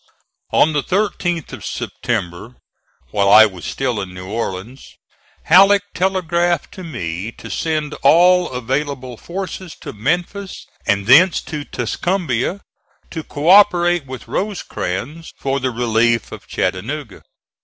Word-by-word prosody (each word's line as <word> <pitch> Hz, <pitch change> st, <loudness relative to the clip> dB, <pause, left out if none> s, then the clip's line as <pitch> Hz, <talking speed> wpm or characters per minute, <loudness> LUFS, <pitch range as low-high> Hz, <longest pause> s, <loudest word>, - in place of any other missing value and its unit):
On 155 Hz, -, +4 dB
the 145 Hz, -, +1 dB
13th 180 Hz, -3 st, -1 dB
of -, -, -8 dB
September, 90 Hz, +8 st, -4 dB, 0.6 s
while 100 Hz, -2 st, +2 dB
I 110 Hz, +1 st, +9 dB
was 95 Hz, -5 st, -6 dB
still 125 Hz, -6 st, -2 dB
in 90 Hz, -1 st, -8 dB
New 90 Hz, 0 st, -8 dB
Orleans, 110 Hz, +3 st, -5 dB, 0.5 s
Halleck 195 Hz, +3 st, +6 dB
telegraphed 175 Hz, -2 st, 0 dB
to 190 Hz, -, -9 dB
me 100 Hz, -, -5 dB
to -, -, -10 dB
send 155 Hz, -2 st, -2 dB
all 180 Hz, +5 st, +5 dB
available 130 Hz, +1 st, -3 dB
forces 185 Hz, -, -6 dB
to -, -, -7 dB
Memphis 175 Hz, -, -3 dB, 0.2 s
and 100 Hz, -1 st, +1 dB
thence 165 Hz, -, +6 dB
to 150 Hz, -2 st, -6 dB
Tuscumbia, 175 Hz, -, -2 dB, 0.5 s
to 160 Hz, -, -4 dB
co 145 Hz, +2 st, -5 dB
operate 175 Hz, -5 st, +5 dB
with 130 Hz, -3 st, -8 dB
Rosecrans 165 Hz, -, -4 dB
for 135 Hz, 0 st, -1 dB
the 130 Hz, -1 st, -1 dB
relief 115 Hz, -1 st, +1 dB
of -, -, -10 dB
Chattanooga. 115 Hz, +4 st, -3 dB
145 Hz, 125 wpm, -19 LUFS, 115-175 Hz, 0.6 s, I